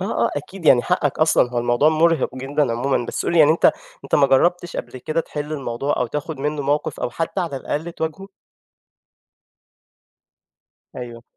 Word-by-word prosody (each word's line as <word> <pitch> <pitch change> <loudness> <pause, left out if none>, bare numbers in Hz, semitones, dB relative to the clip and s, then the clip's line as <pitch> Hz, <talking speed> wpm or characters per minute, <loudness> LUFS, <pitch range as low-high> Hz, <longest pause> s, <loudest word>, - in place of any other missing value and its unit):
آه 195 +4 0
آه - - +1
أكيد 165 +4 -6
يعني 120 -4 +6
حقك 165 -6 0
أصلًا، 155 -5 +3
هو 125 - -2
الموضوع 120 +5 +3
مُرِهق 160 -2 +2
جدًا 135 0 -1
عمومًا، 120 +1 -1
بس - - -4
قُل - - 0
لي 170 - +3
يعني 150 -1 +7
أنت 160 - 0 0.4
أنت - - -1
ما 140 - +5
جربتش 175 +6 +2
قبل - - -6
كده 155 +6 -1
تحل 150 -1 -6
الموضوع 135 -1 -2
أو 125 - 0
تاخد 150 +3 -5
منُّه 150 0 -2
موقف 145 +2 -1
أو 125 - -2
حتى 165 +8 -3
على 165 -6 -3
الأقل 160 +5 -4
تواجهه؟ 165 +5 -5 2.7
أيوه. 120 -2 -8
150 Hz, 175 wpm, -21 LUFS, 130-165 Hz, 2.7 s, يعني